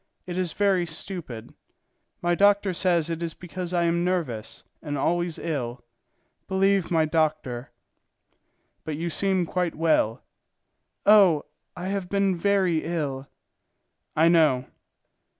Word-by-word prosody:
It 180 Hz, -2 st, -5 dB
is 180 Hz, -3 st, -1 dB
very 195 Hz, -4 st, +2 dB
stupid. 160 Hz, -, -7 dB, 0.7 s
My 175 Hz, 0 st, +2 dB
doctor 200 Hz, +1 st, +3 dB
says 170 Hz, -2 st, +1 dB
it 165 Hz, 0 st, -4 dB
is 165 Hz, -2 st, -4 dB
because 180 Hz, 0 st, -6 dB
I 175 Hz, -1 st, +1 dB
am 170 Hz, 0 st, +1 dB
nervous 160 Hz, -12 st, -3 dB, 0.2 s
and 145 Hz, -2 st, -4 dB
always 175 Hz, +3 st, 0 dB
ill; 125 Hz, -6 st, -4 dB, 0.6 s
believe 195 Hz, -1 st, +2 dB
my 160 Hz, -2 st, +3 dB
doctor." 155 Hz, -6 st, -1 dB, 1.1 s
"But 155 Hz, -2 st, -4 dB
you 170 Hz, +1 st, -3 dB
seem 190 Hz, 0 st, +1 dB
quite 180 Hz, 0 st, -2 dB
well." 155 Hz, -9 st, +1 dB, 0.8 s
"Oh! 195 Hz, -8 st, +6 dB, 0.3 s
I 180 Hz, +2 st, -4 dB
have 195 Hz, -2 st, -3 dB
been 195 Hz, -2 st, +1 dB
very 185 Hz, -3 st, +1 dB
ill." 145 Hz, -5 st, -3 dB, 0.9 s
"I 160 Hz, +2 st, +4 dB
know." 155 Hz, -7 st, +4 dB
170 Hz, 125 wpm, -25 LUFS, 155-185 Hz, 1.1 s, Oh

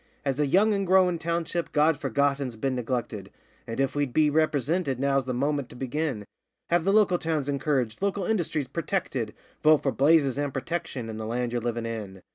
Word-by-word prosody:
'As 135 Hz, 0 st, -1 dB
a 150 Hz, -, +2 dB
young 205 Hz, +9 st, +4 dB
and 195 Hz, -2 st, -1 dB
growin' 180 Hz, -2 st, +4 dB
township 170 Hz, +1 st, -2 dB
God 150 Hz, +1 st, +4 dB
Forgotten's 140 Hz, -2 st, 0 dB
been 130 Hz, +4 st, -1 dB
neglected, 120 Hz, -5 st, -3 dB, 0.4 s
And, 115 Hz, +2 st, -5 dB
if 135 Hz, 0 st, +1 dB
we'd 145 Hz, -4 st, -1 dB
be 155 Hz, -1 st, +3 dB
ripresinted, 155 Hz, -1 st, +1 dB
now's 135 Hz, 0 st, +1 dB
the 130 Hz, -, -2 dB
moment 140 Hz, 0 st, -1 dB
to -, -, -12 dB
begin 130 Hz, -3 st, -3 dB, 0.5 s
Have 175 Hz, -1 st, +2 dB
the 195 Hz, -, +3 dB
local 200 Hz, -4 st, +4 dB
towns 155 Hz, -4 st, -1 dB
encouraged, 140 Hz, -4 st, -1 dB
local 200 Hz, -1 st, 0 dB
industries 165 Hz, -9 st, -1 dB
purtected: 150 Hz, -, -2 dB, 0.3 s
Vote 155 Hz, -1 st, +5 dB
for 135 Hz, -, +1 dB
Blazes, 140 Hz, +1 st, +3 dB
and 145 Hz, -1 st, -1 dB
Protection, 135 Hz, -3 st, -4 dB
and 110 Hz, -1 st, -6 dB
the 110 Hz, -, -4 dB
land 120 Hz, +1 st, -2 dB
ye're 120 Hz, 0 st, -1 dB
livin' 120 Hz, 0 st, -2 dB
in. 105 Hz, -5 st, -6 dB
140 Hz, 190 wpm, -26 LUFS, 125-165 Hz, 0.5 s, Vote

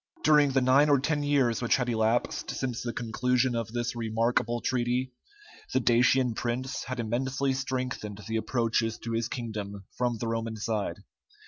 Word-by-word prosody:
During 150 Hz, -2 st, +5 dB
the 135 Hz, -, +3 dB
nine 135 Hz, +4 st, +5 dB
or 140 Hz, -2 st, +5 dB
ten 150 Hz, +2 st, 0 dB
years 140 Hz, -5 st, +2 dB
which 120 Hz, -, +3 dB
had 125 Hz, -2 st, -1 dB
elapsed 115 Hz, 0 st, 0 dB
since 125 Hz, -3 st, -3 dB
the 120 Hz, -, -3 dB
conclusion 125 Hz, +2 st, 0 dB
of 115 Hz, -2 st, -3 dB
this 120 Hz, +1 st, -2 dB
remarkable 115 Hz, +1 st, 0 dB
treaty, 125 Hz, +1 st, -1 dB, 0.6 s
the -, -, +4 dB
Dacian 125 Hz, +1 st, +3 dB
prince 125 Hz, +3 st, -3 dB
had 130 Hz, 0 st, -4 dB
immensely 130 Hz, +4 st, 0 dB
strengthened 130 Hz, -6 st, -3 dB
the 110 Hz, 0 st, -1 dB
approaches 115 Hz, -1 st, 0 dB
to 115 Hz, -, -6 dB
his 115 Hz, 0 st, 0 dB
kingdom 105 Hz, -5 st, -5 dB
from 120 Hz, -2 st, 0 dB
the 115 Hz, -, -3 dB
Roman 115 Hz, -1 st, -2 dB
side. 105 Hz, -4 st, -2 dB
120 Hz, 160 wpm, -28 LUFS, 115-130 Hz, 0.6 s, During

